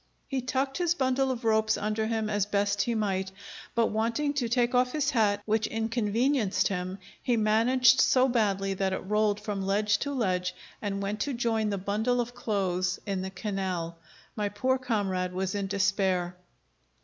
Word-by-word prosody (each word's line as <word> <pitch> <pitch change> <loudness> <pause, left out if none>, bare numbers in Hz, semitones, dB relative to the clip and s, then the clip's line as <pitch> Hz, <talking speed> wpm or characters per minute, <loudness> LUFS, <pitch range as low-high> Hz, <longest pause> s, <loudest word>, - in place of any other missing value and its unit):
He 270 -2 -2
tucked 270 +3 -1
his 345 -1 +2
bundle 265 -2 +1
of 245 -2 -3
ropes 220 0 +3
under 215 +1 -1
him 220 -1 -1
as 205 -1 0
best 205 0 +1
he 235 +2 0
might, 190 -3 -1 0.4
but 230 -1 +2
wanting 230 +7 0
to 255 -5 -1
take 240 +1 +2
off 250 0 +2
his 300 -1 +1
hat, 210 -5 +2
which 220 0 +1
inconvenienced 225 +1 +1
him, 185 -1 -3 0.2
he 245 -2 +1
managed 230 +4 +4
so 255 0 +4
badly 200 -5 +1
that 190 0 -1
it 190 - -4
rolled 210 0 +1
from 210 -2 -4
ledge 200 +1 +1
to 285 - -2
ledge, 185 -8 -1 0.3
and 200 -1 -2
went 205 +2 -3
to 280 +5 -1
join 225 -3 0
the 200 - -1
bundle 215 +6 0
of 240 0 -2
clothes 190 -6 -1
in 195 -2 -2
the 190 - -4
canal. 190 -4 -3 0.4
My 210 -2 -1
poor 260 +6 0
comrade 195 -7 -1
was 185 0 -2
in 200 -1 -2
despair. 190 -3 0
215 Hz, 175 wpm, -28 LUFS, 195-245 Hz, 0.4 s, managed